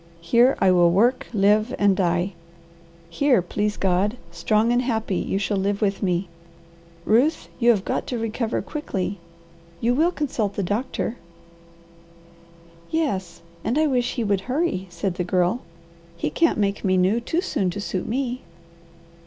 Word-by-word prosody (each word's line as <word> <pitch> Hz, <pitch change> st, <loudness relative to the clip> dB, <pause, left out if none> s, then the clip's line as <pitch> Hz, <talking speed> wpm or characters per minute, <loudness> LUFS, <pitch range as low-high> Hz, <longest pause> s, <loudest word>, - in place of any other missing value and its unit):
Here 240 Hz, +9 st, +4 dB
I 190 Hz, -, +4 dB
will 175 Hz, -1 st, +5 dB
work, 225 Hz, +9 st, +2 dB
live, 215 Hz, +3 st, +2 dB
and 200 Hz, -1 st, +3 dB
die. 180 Hz, +1 st, 0 dB, 0.7 s
Here, 255 Hz, +8 st, +2 dB
please 205 Hz, +3 st, -2 dB
God, 195 Hz, +5 st, +1 dB
strong 215 Hz, +7 st, +1 dB
and 245 Hz, +1 st, +3 dB
happy, 220 Hz, -6 st, -1 dB
you -, -, -1 dB
shall 200 Hz, +1 st, -1 dB
live 200 Hz, +1 st, 0 dB
with 200 Hz, -2 st, 0 dB
me. 180 Hz, -1 st, 0 dB, 0.8 s
Ruth, 265 Hz, +9 st, +2 dB
you 240 Hz, -1 st, +4 dB
have 205 Hz, -5 st, +3 dB
got -, -, -2 dB
to 245 Hz, -, -2 dB
recover 225 Hz, +1 st, -2 dB
quickly. 200 Hz, -, -4 dB, 0.6 s
You 235 Hz, +5 st, +2 dB
will 315 Hz, +7 st, +3 dB
consult 240 Hz, -, -2 dB
the 200 Hz, -, -1 dB
doctor?" 225 Hz, +4 st, -2 dB, 1.7 s
"Yes, 190 Hz, -, -2 dB, 0.2 s
and 235 Hz, +6 st, 0 dB
I 310 Hz, -, +4 dB
wish 250 Hz, -4 st, 0 dB
he 240 Hz, -, -1 dB
would 200 Hz, -2 st, +1 dB
hurry," 255 Hz, -, -1 dB
said 175 Hz, +2 st, -3 dB
the 180 Hz, -, 0 dB
Girl. 180 Hz, +6 st, +1 dB, 0.6 s
"He -, -, -2 dB
can't 330 Hz, -1 st, +2 dB
make 200 Hz, -1 st, 0 dB
me 185 Hz, -1 st, +2 dB
new 190 Hz, +5 st, +3 dB
too 325 Hz, +8 st, -1 dB
soon 190 Hz, -, -1 dB
to 180 Hz, -, -5 dB
suit 190 Hz, -2 st, -3 dB
me. 255 Hz, +1 st, -2 dB
210 Hz, 155 wpm, -23 LUFS, 190-245 Hz, 1.7 s, will